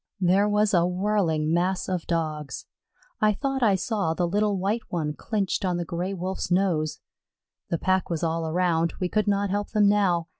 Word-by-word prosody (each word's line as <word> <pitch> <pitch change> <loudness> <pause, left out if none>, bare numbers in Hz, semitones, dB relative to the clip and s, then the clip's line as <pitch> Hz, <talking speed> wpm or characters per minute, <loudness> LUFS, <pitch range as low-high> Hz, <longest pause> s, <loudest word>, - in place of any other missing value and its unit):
There 195 +3 +3
was 210 0 +2
a 170 -2 +4
whirling 180 -4 0
mass 180 +2 0
of 180 -3 -3
Dogs. 155 -3 -3 0.5
I 215 0 +3
thought 270 +4 -2
I 210 -5 +4
saw 190 -4 -1
the 175 0 0
little 205 +2 +1
White 200 +5 0
One 155 -4 -2
clinched 200 +2 -2
on 180 -2 0
the 175 - -3
Gray 180 +3 -3
wolf's 185 +1 -3
nose. 175 -4 0 0.7
The 170 - 0
pack 185 +2 0
was 170 -1 -2
all 165 0 -1
around; 170 0 +1
we 180 -2 -1
could 215 +2 0
not 200 -1 +1
help 205 +1 -1
them 210 -2 +4
now. 190 -5 +2
185 Hz, 185 wpm, -25 LUFS, 170-205 Hz, 0.7 s, a